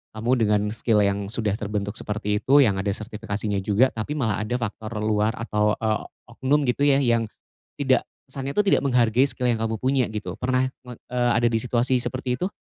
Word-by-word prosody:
kamu 115 +3 -1
dengan 105 -2 +2
skill 110 -1 +2
yang 100 0 -1
sudah 110 -2 0
terbentuk 105 -1 -3
seperti 105 0 -2
itu, 140 +2 +4
yang 100 -6 +1
ada 100 +1 -1
sertifikasinya 105 -1 -3
juga 105 +7 +3
tapi 110 +6 -4
malah 110 -6 0
ada 110 +3 -2
faktor 110 -1 -4
luar 110 +1 +1
atau, 105 -2 0
eee, 110 -1 0 0.3
oknum 130 +5 +1
gitu 130 +4 0
ya, 140 -1 +5
yang 115 -3 +2 0.5
tidak 130 -3 +2 0.3
kesannya 135 +1 -4
tuh - - +1
tidak 195 - +3
menghargai 125 -1 +3
skill 125 -2 +1
yang 120 - +2
kamu 110 -1 -2
punya 130 0 +2
gitu. 105 0 -4
Pernah 130 0 0 0.2
me 125 -2 -9
eee, 120 -1 -1
ada 120 - +2
di 115 - 0
situasi 125 +1 +1
seperti 125 0 -2
itu? 185 - 0
115 Hz, 195 wpm, -24 LUFS, 105-125 Hz, 0.5 s, ya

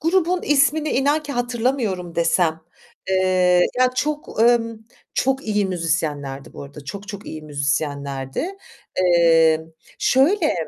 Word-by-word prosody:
grubun 355 +2 +1
ismini 295 +2 +2
inan 285 +4 +1
ki 290 -1 -6
hatırlamıyorum 240 -7 -2
desem, 165 -1 +1 0.5
eee, 185 -1 +3 0.2
ya, 255 0 +4
çok, 300 -1 -2
emm, 230 -1 +2 0.4
çok 265 +1 0
iyi 210 -2 0
müzisyenlerdi 155 -6 -3
bu - - -9
arada 140 +1 -11
çok, 200 +8 -8
çok 200 +1 -8
iyi 155 - -7
müzisyenlerdi. 140 - -3 0.4
Eee, 165 -3 +4 0.4
şöyle 310 +6 +3
190 Hz, 120 wpm, -21 LUFS, 160-270 Hz, 0.5 s, ya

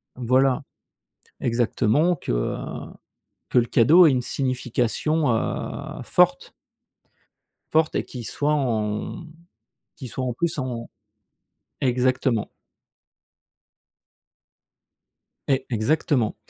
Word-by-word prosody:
voilà. 130 +3 +2 0.8
Exactement 125 +7 +2
que, - - -5
heu, - - -1 0.9
que - - +4
le 120 - +3
cadeau 160 +11 +6
ait - - +6
une 125 - 0
signification, 130 +3 0
heu, 110 - -3
forte - - +2 1.2
forte 160 0 +2
et - - +1
qui 125 -3 -8
soit 145 +7 -1
en, 110 -7 0 0.2
hem, 160 - -14 0.6
qui 130 - -8
soit 130 +2 -4
en 125 - -1
plus 170 +5 -2
en 125 -3 -4 0.9
exactement. 125 -2 +1 3.0
E 135 -1 +3
exactement. 125 0 +1
130 Hz, 95 wpm, -24 LUFS, 115-145 Hz, 3.0 s, cadeau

